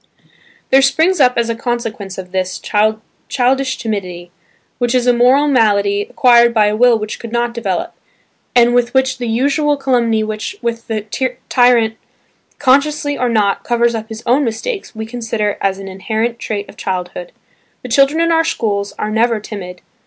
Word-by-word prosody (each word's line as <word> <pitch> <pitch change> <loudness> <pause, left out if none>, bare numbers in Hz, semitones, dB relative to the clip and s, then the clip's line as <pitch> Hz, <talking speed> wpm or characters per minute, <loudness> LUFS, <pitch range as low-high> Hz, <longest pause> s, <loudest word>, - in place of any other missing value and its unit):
There 270 +1 +6
springs 320 +6 +2
up 250 -3 +4
as 235 -1 +1
a 230 - -1
consequence 225 -5 -4
of 180 -1 -8
this, 185 -1 -2 0.7
childish 260 +1 +1
timidity, 180 -6 -5 0.5
which 245 0 0
is 250 -1 +2
a 245 - +4
moral 255 +5 +4
malady 205 -6 +2
acquired 235 -1 +4
by 215 -1 +4
a 210 0 +1
will 240 +1 +4
which 215 0 -6
could 230 - -8
not 240 0 -1
develop, 200 -6 -3 0.6
and 240 0 +5
which 245 +1 +1
with 265 -1 +1
the 240 - -3
usual 285 +5 +1
calumny 240 -5 +1
with 215 0 -4 0.2
which 230 0 -3
the 225 +4 -3
tyrant 235 -3 +3 0.6
consciously 290 +2 +2
or 250 -2 -1
not, 210 -4 +1
covers 235 0 +1
up 220 0 -5
his 220 +1 -8
own 255 +5 +3
mistakes, 245 - -4
we 220 0 -5
consider 225 -3 -2
as 195 -1 0
an 195 0 -8
inherent 220 +5 -3
trait 205 -2 -4
of - - -15
childhood. 180 -1 -4 0.5
The 250 - -7
children 275 +5 +3
in 335 0 +2
our 325 0 +3
schools 205 -9 -2
are 210 - -3
never 225 0 +1
timid. 180 -4 -8
235 Hz, 170 wpm, -16 LUFS, 215-255 Hz, 0.7 s, There